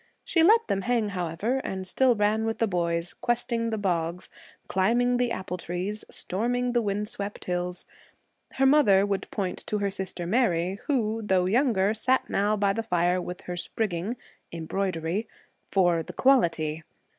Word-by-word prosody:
She 330 - +2
let 450 +7 +5
them 195 - 0
hang, 235 -1 0
however, 185 +6 -2
and 190 -7 -4
still 250 +6 +3
ran 210 +1 +1
with 225 0 -1
the 225 - +2
boys, 170 -3 -1
questing 235 -1 -1
the 220 - -2
bogs, 175 -3 -2 0.4
climbing 240 +6 +2
the 245 -1 +1
apple 185 -3 -4
trees, 185 +6 -4
storming 245 +6 -1
the 240 -1 +2
wind 210 0 -2
swept 205 -1 -5
hills. 180 0 -3 0.7
Her 270 - +2
mother 255 -9 +5
would 200 -1 -2
point 190 -4 -3
to 210 - -1
her 200 -1 -1
sister 190 -2 -3
Mary, 185 -3 +1
who, 225 -5 0
though 190 -4 +2
younger, 215 -2 +2
sat 255 +4 +1
now 205 +2 +1
by 200 -1 +2
the 225 - -2
fire 180 -3 +1
with 180 0 -6
her 180 - -6
'spriggin'' 195 +4 -2 0.3
[embroidery] 170 +3 -2 0.4
for 175 -4 +2
'the - - -9
quality.' 165 - +2
200 Hz, 160 wpm, -27 LUFS, 180-230 Hz, 0.7 s, let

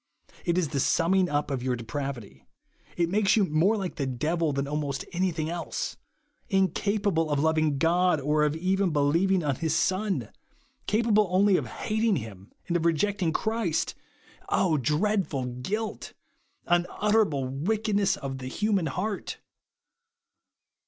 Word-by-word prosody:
It 170 0 +1
is 170 -5 +1
the 140 -2 -2
summing 180 +6 +2
up 145 0 -1
of 135 -2 -2
your 125 0 0
depravity. 120 - -6 0.5
It 170 -1 +2
makes 205 0 +3
you 205 - +4
more 175 +7 +2
like 190 -3 -4
the 140 -3 -1
devil 155 +5 0
than 140 0 -2
almost 145 -2 -3
anything 170 -3 -1
else. 170 +1 -4 0.5
In 195 -2 +3
capable 200 -4 0
of 145 - +1
loving 155 -1 +2
God, 175 +2 +3
or 150 +2 +1
even 185 +6 0
of 170 - -2
believ 155 +7 +2
ing 185 -3 +2
on 140 -4 0
his 160 -2 0
Son! 185 - 0 0.6
Capable 215 -1 +3
only 190 +2 +4
of - - 0
hating 220 -1 0
him, 105 - -7 0.2
and 175 - -1
of 170 - +1
rejecting 175 +2 +1
Christ! 215 -3 -1 0.9
dreadful 155 - 0
guilt! 190 - -4 0.5
Unutterable 175 -4 +1
wickedness 205 - 0
of 135 -1 -5
the 130 - -6
human 200 +4 0
heart 195 +8 -3
170 Hz, 140 wpm, -27 LUFS, 145-195 Hz, 0.9 s, you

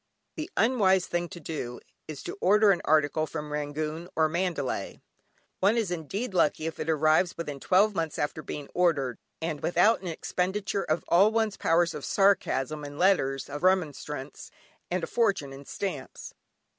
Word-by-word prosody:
The 310 - -5
unwise 200 -6 +3
thing 175 0 -2
to 175 - -9
do, 135 -7 -5 0.3
is 155 -3 -7
to - - -5
order 210 +2 +5
an 180 - +1
article 155 0 +2
from 150 -1 -6
Rangoon 155 +3 -3
or 160 0 +3
Mandalay. 160 - -2 0.6
One 205 +5 +3
is 215 -6 0
indeed 185 - -4
lucky 155 -3 +2
if 160 - -4
it 160 - -3
arrives 155 +3 +3
within 150 -4 -5
twelve 200 +8 +3
months 165 -4 -2
after 150 +1 -2
being 145 -1 -6
ordered, 150 -9 +1 0.2
and 155 -3 -3
without 180 +6 +3
an 185 - -6
expenditure 190 +4 -2
of 155 +2 -1
all 195 +5 +5
one's 220 -2 0
powers 165 0 +2
of 150 -2 -7
sarcasm 155 -7 +1
in 145 0 -8
letters 145 -8 +2
of 145 +1 -6
remonstrance, 150 -6 -1 0.4
and 180 -1 -1
a - - +1
fortune 195 -12 0
in 140 +1 -11
stamps. 165 -8 -5
165 Hz, 165 wpm, -28 LUFS, 150-190 Hz, 0.6 s, order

